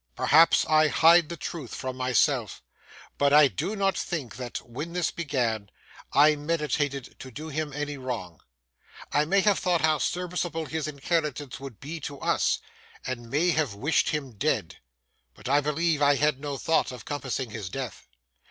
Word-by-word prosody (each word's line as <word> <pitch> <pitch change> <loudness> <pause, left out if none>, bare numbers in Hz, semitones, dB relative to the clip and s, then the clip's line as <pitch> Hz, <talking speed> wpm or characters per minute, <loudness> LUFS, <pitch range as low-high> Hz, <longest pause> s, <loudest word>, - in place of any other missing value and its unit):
Perhaps 165 +2 +5
I 155 0 +4
hide 165 +4 +5
the 170 - -5
truth 150 -6 -6
from 130 -1 -4
myself, 130 -2 +1 0.6
but 140 0 +3
I 150 0 +8
do 135 - -3
not 195 -1 +1
think 145 - -4
that, 125 -2 -5
when 150 +8 -6
this 180 -2 0
began, 120 -10 -2 0.4
I 150 +2 +6
meditated 145 -3 -2
to 130 - -9
do 155 +6 -8
him 155 0 -3
any 145 0 -4
wrong. 115 -10 -5 0.7
I 145 +1 +2
may 195 +5 +3
have 205 -1 +3
thought 175 -3 +1
how 155 -1 +3
serviceable 175 -2 -2
his 155 0 -3
inheritance 150 -2 -2
would 135 -5 -9
be 155 +4 -6
to 140 -1 -7
us, - - +1 0.5
and 120 -2 -5
may 160 +7 +2
have 150 -10 0
wished 145 +10 +1
him 145 -4 -3
dead; 105 - -1 0.6
but - - -10
I 145 +2 +4
believe 150 +1 0
I 145 0 +5
had 150 -1 +1
no 145 -1 -4
thought 160 +3 +1
of 125 - -10
compassing 135 -4 -3
his 105 -4 -5
death. 125 0 -6
145 Hz, 170 wpm, -27 LUFS, 130-160 Hz, 0.7 s, I